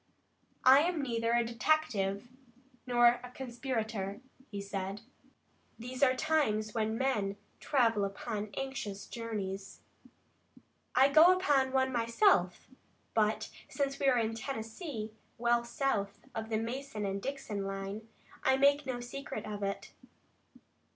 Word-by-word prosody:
"I 260 +2 +9
am 335 +2 +1
neither 230 -2 0
a 235 0 +3
detective 230 -5 0 0.6
nor 240 0 +5
a 250 - -7
conspirator," 235 -6 -3 0.3
he 205 - -5
said. 195 0 -4 0.8
"These 250 +3 -7
are 260 -2 +5
times 255 -8 +1
when 220 -1 0
men 210 -7 0 0.2
travel 230 -7 +2
upon 205 +1 -3
anxious 265 -8 -4
journeys. 200 -4 -5 1.1
I 265 +2 +7
go 315 +5 +8
upon 280 -8 +2
one 265 0 +2
myself, 230 - +3 0.5
but 215 -1 +1 0.2
since 275 -1 -2
we 275 - +2
are 255 -2 +5
in 225 -1 +1
Tennessee, 225 - -5 0.3
well 235 0 +2
south 235 -5 -1 0.2
of 220 0 -4
the 220 - +1
Mason 230 -1 -4
and 195 0 -2
Dixon 230 -7 -4
line, 195 +3 -5 0.4
I 265 - +4
make 280 +1 +4
no 245 -2 -2
secret 240 -2 -6
of 210 -1 -5
it. 200 0 -3
235 Hz, 125 wpm, -32 LUFS, 210-265 Hz, 1.1 s, I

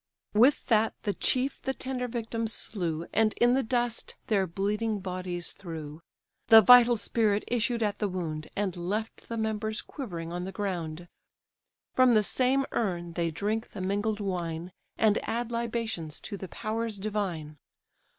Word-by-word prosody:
With 245 +7 +5
that 220 -1 +3
the 205 - 0
chief 260 +6 0
the 265 0 -2
tender 255 -1 -3
victims 230 -1 -2
slew, 170 -5 -2
And 220 0 +3
in 240 +1 +4
the 265 - +3
dust 240 -1 -1
their 195 -4 +2
bleeding 210 +4 -1
bodies 180 -2 -4
threw; 160 -4 -8 0.5
The 225 -1 +10
vital 240 +1 +8
spirit 210 -1 +1
issued 235 0 0
at 205 -1 -1
the 210 - 0
wound, 160 -4 -4
And 195 -3 -1
left 205 +6 -4
the 230 - -3
members 220 0 -1
quivering 170 - -6
on 175 0 -3
the 190 - -5
ground. 175 -5 -4 0.9
From 255 -2 +5
the 215 - +5
same 260 +5 +2
urn 175 -6 -2
they 170 -1 0
drink 210 +7 -2
the - - -8
mingled 205 +3 0
wine, 175 -3 -3 0.3
And 220 -1 +4
add 235 +1 -2
libations 230 -9 -3
to 205 - -5
the 190 -1 -7
powers 220 +1 -3
divine. 190 -7 -3
210 Hz, 155 wpm, -29 LUFS, 180-230 Hz, 0.9 s, The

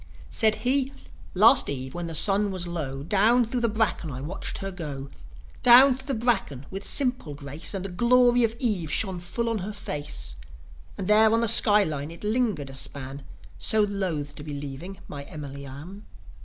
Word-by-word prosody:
Said 220 -1 +3
he: 270 +1 +1 0.4
"Last 225 +8 +5
eve, 130 -2 -5
when 175 -1 -5
the 165 - -6
sun 200 +5 +4
was 185 -2 -3
low, 145 -6 -5
Down 220 +8 +2
thro' 245 +3 -3
the 235 -1 0
bracken 215 -6 -1
I 130 -2 -6
watched 150 +7 -6
her 195 0 -5
go 145 -6 -7 0.5
Down 255 +3 +7
thro' 265 +3 -7
the 275 - -1
bracken, 205 - -1
with 195 +1 -6
simple 250 - -1
grace 145 +7 -3
And 195 0 -4
the - - -3
glory 245 +5 +3
of 225 0 0
eve 205 - -1
shone 190 -4 0
full 235 +7 -4
on 225 -2 -1
her 200 +3 -6
face; 145 - -5 0.6
And 190 - -5
there 215 +1 +5
on 230 +1 +2
the 230 - +1
sky 210 0 +8
line 150 -4 -4
it 170 +3 -12
lingered 210 - -1
a - - -12
span, 135 +1 -3 0.4
So 220 - +2
loth 180 -8 -3
to 145 - -7
be 150 -1 -7
leaving 145 +7 -8
my 145 - -8
Emily 140 -2 -9
Arm." 165 +10 -11
190 Hz, 190 wpm, -25 LUFS, 145-225 Hz, 0.6 s, sky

